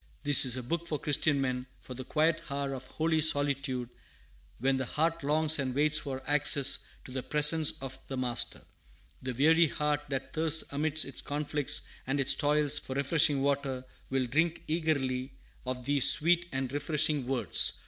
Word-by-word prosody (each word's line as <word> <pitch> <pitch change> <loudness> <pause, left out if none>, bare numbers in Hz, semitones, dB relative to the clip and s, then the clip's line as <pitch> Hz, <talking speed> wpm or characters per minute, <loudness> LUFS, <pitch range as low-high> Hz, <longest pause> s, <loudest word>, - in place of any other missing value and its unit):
"This 145 -3 +5
is 125 -1 +2
a 125 - -5
book 170 +7 -4
for 155 - -2
Christian 145 -1 +1
men, 130 -1 -3
for 130 - -10
the 130 +1 -8
quiet 155 +4 0
hour 140 0 -3
of 130 -1 -8
holy 160 +2 -1
solitude, 140 -4 +1 0.7
when 135 +2 0
the 130 - -3
heart 165 +1 -1
longs 155 +1 +2
and 130 -2 -3
waits 150 +2 +2
for 130 -2 -6
access 145 -1 +3 0.3
to - - -11
the 130 0 -4
presence 150 +2 +2
of 135 0 -6
the 135 - -5
Master. 125 -2 -2 0.6
The 130 -1 -5
weary 160 +5 +4
heart 150 0 -2
that 135 -2 -5
thirsts 160 0 +3
amidst 155 +2 +1
its 135 - -5
conflicts 145 -1 0 0.2
and 140 +2 -1
its 135 - +5
toils 150 -1 +2
for 130 - -8
refreshing 140 0 +1
water 140 -2 -2 0.2
will 135 -1 0
drink 160 +7 -1
eagerly 135 -5 -2 0.3
of 125 -1 -4
these 140 -2 +5
sweet 175 +2 +3
and 130 -1 -4
refreshing 145 -2 0
words. 130 -2 +2
145 Hz, 170 wpm, -29 LUFS, 130-155 Hz, 0.7 s, This